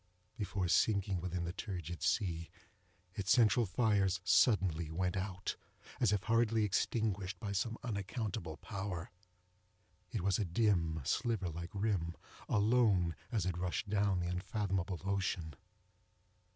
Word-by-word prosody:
Just - - -34
before 95 -2 -1
sinking 100 -1 +2
within 90 0 -2
the 85 +1 -3
turgid 90 -5 -5
sea, 85 -6 0 0.6
its 100 -2 -4
central 115 -1 +5
fires 100 -3 +2
suddenly 90 -8 +3
went 90 +3 -1
out, 95 -1 -3 0.4
as 120 -6 +3
if 105 -2 +1
hurriedly 115 -1 +3
extinguished 100 -1 0
by 105 -3 -4
some 110 +4 -1
unaccountable 100 - -3
power. 95 -5 -5 1.0
It 110 - -2
was 95 +2 +2
a - - +2
dim, 85 -5 +1
sliver 105 - 0
like 85 +2 -6
rim, 100 -5 -1 0.3
alone, 105 -6 +3 0.2
as 110 -7 0
it 90 -2 -1
rushed 90 +3 -2
down 100 -3 +2
the 85 - -2
unfathomable 95 -1 -2
ocean. 95 -5 -1
95 Hz, 130 wpm, -35 LUFS, 90-105 Hz, 1.0 s, central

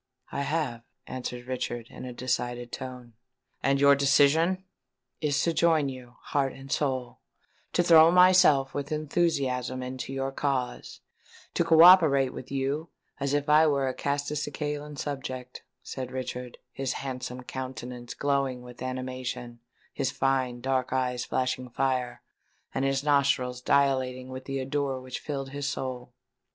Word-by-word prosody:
"I 140 - -2
have," 140 -5 -1 0.2
answered 125 -1 -6
Richard, 120 -2 -4
in - - -8
a 125 - -6
decided 120 -1 -2
tone. 125 -2 -7 0.5
"And 135 0 +2
your 140 0 +7
decision——" 145 +6 +3 0.6
"Is 145 -2 +1
to 170 - +1
join 160 -4 +3
you, 125 -2 -10
heart 135 -2 0
and 135 0 -11
soul—to 130 +5 -3
throw 165 -1 +8
myself 180 -6 +5
with 145 +1 -4
enthusiasm 140 -5 0
into 130 +1 -5
your 135 0 -2
cause—to 135 +4 -4
co 165 -1 +6
operate 155 -8 +7
with 130 - -9
you 140 +4 -2 0.3
as 140 0 0
if 145 0 -1
I 155 +2 +6
were 140 -2 +1
a 130 - -1
Castelcicalan 145 +1 -3
subject," 130 -3 -5 0.2
said 130 -1 -6
Richard, 125 -1 -5
his 135 -1 -2
handsome 125 -1 -5
countenance 125 -2 -6
glowing 140 -3 0
with 125 -1 -12
animation, 130 -2 -5 0.3
his 135 -2 -1
fine 130 -2 0
dark 130 -1 0
eyes 125 -1 0
flashing 130 0 -1
fire, 125 -1 -1 0.5
and 135 - -1
his 135 0 0
nostrils 140 -4 +2
dilating 130 -2 +1
with 130 0 -7
the 135 0 -3
ardour 135 0 -1
which 130 0 -6
filled 135 -2 -5
his 140 -1 -3
soul. 125 -2 -5
135 Hz, 140 wpm, -28 LUFS, 125-145 Hz, 0.6 s, throw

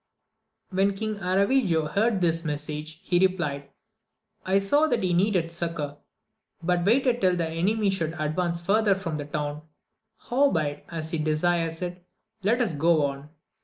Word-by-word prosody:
When 195 +1 +2
King 215 +1 -3
Aravigo 190 - +2
heard 210 -1 +1
this 165 -1 +1
message, 150 +1 -4
he 175 - +2
replied, 160 -7 0 0.7
I 190 +1 +2
saw 285 +11 +3
that - - 0
he 180 -1 +1
needed 180 -2 +1
succour, 165 -4 -3 0.7
but 175 0 +1
waited 245 +2 +3
till 185 -2 +3
the 170 -2 -1
enemy 195 +6 +1
should 165 -4 -1
advance 170 +2 -1
farther 205 0 +3
from 170 -5 -4
the 145 - -5
town; 150 0 -4 0.6
howbeit, 165 - 0
as 160 -1 -4
he 165 - -1
desires 165 +2 0
it, 175 0 -6 0.4
let 225 +5 +2
us 210 -9 0
go 155 +1 +3
on. 140 +1 -5
175 Hz, 150 wpm, -26 LUFS, 155-195 Hz, 0.7 s, saw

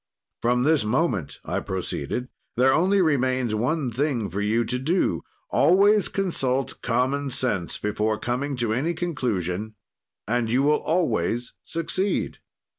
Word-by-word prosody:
"'From 125 +1 +2
this 155 -3 +3
moment,' 110 - -1
I - - -1
proceeded, 95 - -3 0.3
'there 130 +2 +5
only 190 +5 +3
remains 130 -6 +1
one 125 +4 0
thing 120 - -1
for 100 +4 -2
you 110 +3 +1
to 125 +3 -2
do, 165 +8 +1 0.3
always 200 +3 +5
consult 135 -9 -1
common 130 +4 0
sense 120 -9 -1
before 105 +1 -1
coming 130 +5 -2
to 120 -2 0
any 155 +9 0
conclusion, 110 - -2 0.5
and 120 0 0
you 130 +3 +3
will 150 +1 +4
always 120 - 0
succeed. 185 +4 -2
125 Hz, 130 wpm, -25 LUFS, 110-155 Hz, 0.5 s, there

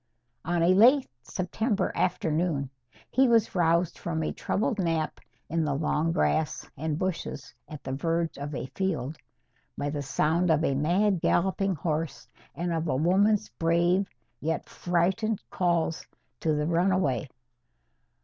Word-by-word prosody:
On 175 0 0
a 180 +2 +5
late 255 +8 +6
September 195 - -1
afternoon, 160 -5 0 0.4
he 265 +1 +4
was 230 -2 +3
roused 170 -1 +2
from 160 -2 -2
a - - -2
troubled 215 +1 -1
nap 165 -3 -1 0.3
in 165 0 0
the 145 -2 0
long 155 +2 0
grass 160 -2 0
and 150 +1 -2
bushes 185 0 -4 0.2
at 150 -3 -9
the 130 - -4
verge 165 +4 -1
of 145 +1 -5
a - - -3
field, 165 -7 -2 0.6
by 145 0 -2
the 145 -1 -3
sound 155 +6 +1
of 160 0 +3
a 140 - +2
mad 175 +6 +2
galloping 190 +1 +1
horse 155 0 -3 0.3
and 170 +3 -2
of 165 0 -1
a 130 - +1
woman's 195 +8 +3
brave 175 +3 +2 0.3
yet 160 +1 -2
frightened 190 +5 0
calls 170 -3 0 0.4
to 155 -2 +1
the 150 0 0
runaway. 170 -5 +1
170 Hz, 140 wpm, -27 LUFS, 155-185 Hz, 0.6 s, late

